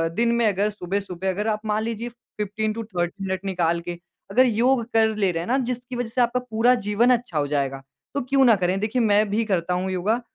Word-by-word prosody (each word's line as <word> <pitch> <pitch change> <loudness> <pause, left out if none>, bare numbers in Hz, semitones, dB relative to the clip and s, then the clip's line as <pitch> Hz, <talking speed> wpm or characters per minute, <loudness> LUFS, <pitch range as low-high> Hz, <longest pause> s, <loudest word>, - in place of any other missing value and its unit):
दिन 235 +1 +2
में 235 -1 +2
अगर 205 +1 +1
सुबह-सुबह 190 -2 -3
अगर 205 +4 -2
आप 215 -1 0
मान 215 0 0
लीजिए 230 +1 -3
15 215 -2 -4
टू 230 +1 -4
30 185 -2 -3
मिनट 190 0 -3
निकाल 170 -3 0
के 175 +1 -5 0.4
अगर 255 +6 +5
योग 240 +2 +2
कर 220 -1 +3
ले 200 -3 +1
रहे 165 -1 -2
हैं - - -8
ना, 255 - +2
जिसकी 250 -1 -3
वज़ह 245 -1 -3
से 250 +2 0
आपका 240 +1 +2
पूरा 245 0 +2
जीवन 210 +2 +1
अच्छा 240 -9 0
हो 145 -1 +1
जाएगा, 135 -2 -1 0.3
तो 285 - -1
क्यों 270 +2 +2
ना 230 -3 +6
करें? 185 0 0
देखिए 220 +4 0
मैं 210 -1 +3
भी 215 +3 +1
करता 180 -4 0
हूँ 185 +1 -1
योगा 205 +6 0
215 Hz, 230 wpm, -23 LUFS, 190-235 Hz, 0.4 s, ना